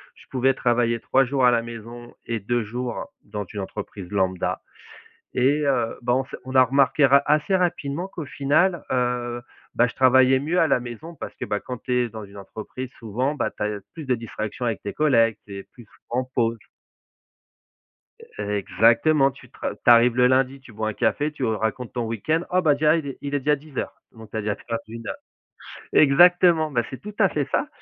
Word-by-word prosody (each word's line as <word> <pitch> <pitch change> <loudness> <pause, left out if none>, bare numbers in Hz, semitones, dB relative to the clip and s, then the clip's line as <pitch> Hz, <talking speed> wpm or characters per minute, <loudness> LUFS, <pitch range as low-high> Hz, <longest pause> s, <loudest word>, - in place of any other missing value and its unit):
je - - -18
pouvais 135 +1 +2
travailler 120 -2 +1
3 135 - +2
jours 130 0 0
à 125 - +7
la 115 -1 +1
maison 120 +1 -9
et 115 -1 -2
2 120 +4 -1
jours 120 +2 -5
dans 105 0 -5
une 100 +2 -6
entreprise 100 -1 -7
lambda. 95 -2 -1 0.7
Et, 140 +4 +2
heu, 120 -5 0
bah, 120 0 +1
on 130 +1 +1
s'est 135 - -9
on 130 +1 -7
a 130 - +8
remarqué 140 +3 +3
ra 140 +1 +5
assez 150 +6 +2
rapidement 170 -2 -1
qu'au 165 -5 -7
final, 150 +6 +1
heu, 120 -1 -1 0.3
bah, 120 - +4
je - - -10
travaillais 130 0 +5
mieux 165 +6 0
à 160 - +3
la 130 - +3
maison, 125 +8 -8
parce - - -8
que, - - -5
bah, 105 - -2
quand 125 - -6
tu 125 - -4
es 125 -1 +1
dans 110 -1 -8
une 100 0 -13
entreprise, 110 +5 -8
souvent, 125 +6 -2
bah, - - -1
tu - - -8
as - - +1
l 105 -1 -4
plus 155 -4 -8
de 130 - +2
distractions 115 0 -5
avec 115 -3 -2
tes 100 - -5
collègues, 115 -8 +3
tu 100 -1 -8
es 100 - -7
plus 120 - -16
souvent 120 +3 -5
en - - -7
pause. 115 -1 +1 1.8
Exactement, 115 +8 +3
tu - - -17
tra - - -5
tu - - -26
arrives 120 0 +6
le 125 0 +5
lundi, 135 +1 +1
tu 130 -3 -15
bois 110 +1 -3
un 110 - -2
café, 150 +8 0
tu 145 -3 -4
racontes 110 +2 -2
ton 120 -1 -2
week-end, 155 +10 -1
oh 185 0 +2
bah, 150 -3 +4
déjà, 150 +2 +3
il 155 -4 -3
est 135 - -7
il 145 0 -4
est 145 - +1
déjà 150 +2 +2
10:00 145 -1 -7
donc 110 -2 -13
tu - - -6
as - - 0
déjà 105 0 -1
perdu 115 +1 -6
1 115 -1 -10
heure. - - -4 0.8
Exactement, 165 +2 +5
bah, 120 -4 +1
c'est 130 - -8
tout 210 0 -9
à 195 - +5
fait 145 -2 -2
ça. 300 - 0
125 Hz, 215 wpm, -23 LUFS, 115-140 Hz, 1.8 s, a